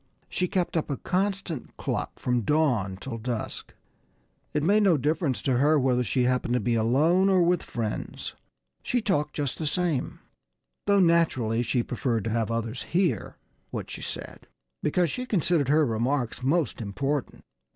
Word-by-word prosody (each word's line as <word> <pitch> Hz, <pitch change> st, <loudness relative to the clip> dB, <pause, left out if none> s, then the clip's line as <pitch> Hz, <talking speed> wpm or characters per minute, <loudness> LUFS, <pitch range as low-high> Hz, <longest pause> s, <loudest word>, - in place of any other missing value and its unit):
She 180 Hz, -, -1 dB
kept 180 Hz, -1 st, -1 dB
up 160 Hz, -, 0 dB
a 140 Hz, -, -1 dB
constant 190 Hz, -6 st, -2 dB
cluck -, -, -3 dB
from 125 Hz, -1 st, 0 dB
dawn 120 Hz, -9 st, +1 dB
till 115 Hz, +3 st, -6 dB
dusk. 115 Hz, 0 st, -4 dB, 0.8 s
It 150 Hz, -, 0 dB
made 205 Hz, +6 st, +4 dB
no 190 Hz, -6 st, +4 dB
difference 150 Hz, -1 st, 0 dB
to 130 Hz, -3 st, +2 dB
her 150 Hz, +2 st, +4 dB
whether 125 Hz, -2 st, +2 dB
she 125 Hz, +2 st, +1 dB
happened 125 Hz, -1 st, +1 dB
to -, -, +2 dB
be 120 Hz, -, 0 dB
alone, 150 Hz, -, +3 dB
or 185 Hz, -2 st, +4 dB
with 175 Hz, 0 st, +2 dB
friends. 110 Hz, -3 st, -4 dB, 0.5 s
She 245 Hz, -, 0 dB
talked 165 Hz, -9 st, 0 dB
just 145 Hz, -4 st, -2 dB
the 155 Hz, -, -1 dB
same 170 Hz, -5 st, 0 dB, 0.7 s
though 200 Hz, 0 st, +5 dB
naturally 160 Hz, -, +3 dB
she 120 Hz, 0 st, 0 dB
preferred 115 Hz, -3 st, -1 dB
to 115 Hz, -, -2 dB
have 115 Hz, -1 st, 0 dB
others 115 Hz, +1 st, -2 dB
hear 180 Hz, 0 st, 0 dB, 0.3 s
what -, -, -5 dB
she -, -, -6 dB
said, -, -, -6 dB, 0.3 s
because 170 Hz, +2 st, +1 dB
she 250 Hz, 0 st, -4 dB
considered 170 Hz, -, +1 dB
her 155 Hz, +1 st, +4 dB
remarks 120 Hz, +2 st, -1 dB
most 140 Hz, -2 st, 0 dB
important. 125 Hz, +7 st, -3 dB
145 Hz, 160 wpm, -27 LUFS, 120-170 Hz, 0.8 s, though